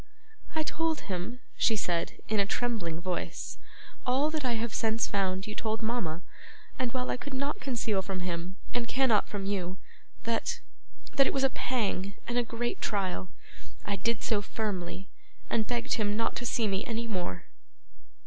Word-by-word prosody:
'I 315 - +3
told 325 0 +1
him,' 195 +7 -3
she 225 - +4
said, 175 -4 +1
in 215 -1 +2
a 200 - +5
trembling 210 -8 0
voice, 180 0 -2 0.4
'all 270 +5 +3
that 310 -2 -1
I 250 -2 +2
have 230 0 -1
since 225 +1 +3
found 190 -1 +1
you 210 - -4
told 220 +1 -1
mama; 185 -8 0 0.6
and 255 -2 +1
while 250 0 0
I - - 0
could 275 +1 -5
not 280 +2 0
conceal 230 -6 +1
from 190 0 -3
him, 180 +1 -2 0.2
and 245 -1 +1
cannot 250 -4 +4
from 200 -2 -2
you, 190 -2 -1 0.5
that 230 0 +1 0.6
that 275 -1 +8
it - - +1
was 270 - +3
a 270 - +5
pang 200 -7 0
and 240 +1 +2
a - - +3
great 240 +1 -2
trial, 185 - 0 0.6
I 200 - +1
did 225 +3 0
so 210 -3 +3
firmly, 195 -3 -2 0.4
and 220 -2 +3
begged 240 -1 0
him 210 -2 +2
not 230 - +1
to 245 - -1
see 230 -2 +2
me 195 -1 +1
any 230 0 0
more. 180 - -2
220 Hz, 175 wpm, -31 LUFS, 190-245 Hz, 0.6 s, that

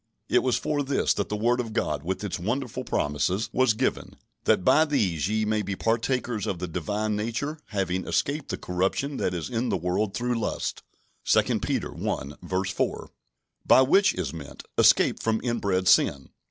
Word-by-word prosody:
It - - +4
was 130 -2 +1
for 150 -1 -1
this 140 -1 +1
that 100 - -3
the 105 - -1
word 120 +4 +1
of 115 -3 -3
God, 75 - -1
with 95 +6 -3
its 100 -3 -3
wonderful 125 +6 -2
promises, 90 - -1
was 130 -4 +3
given: - - -2 0.3
"That - - +3
by 155 - +6
these 100 - 0
ye 110 0 +1
might 105 -2 -1
be 100 - -2
partakers 115 0 -1
of 95 - -2
the 90 +1 -4
Divine 105 +6 -2
nature, 115 +8 -3
having 95 -3 -2
escaped 145 -1 -1
the - - -2
corruption 95 +11 -1
that 90 - -1
is 85 - -3
in 120 0 -1
the 95 - +1
world 95 +4 -1
through 120 -1 -1
lust" - - -3 0.4
(2 - - +3
Peter - - -2
i. 85 +8 -3
4); 95 0 -2 0.5
by - - +6
which 195 +10 +4
is - - -3
meant, 75 -4 -9
escape - - +4
from 110 -1 +1
inbred 100 -6 0
sin. 70 -5 +3
105 Hz, 180 wpm, -26 LUFS, 95-125 Hz, 0.5 s, by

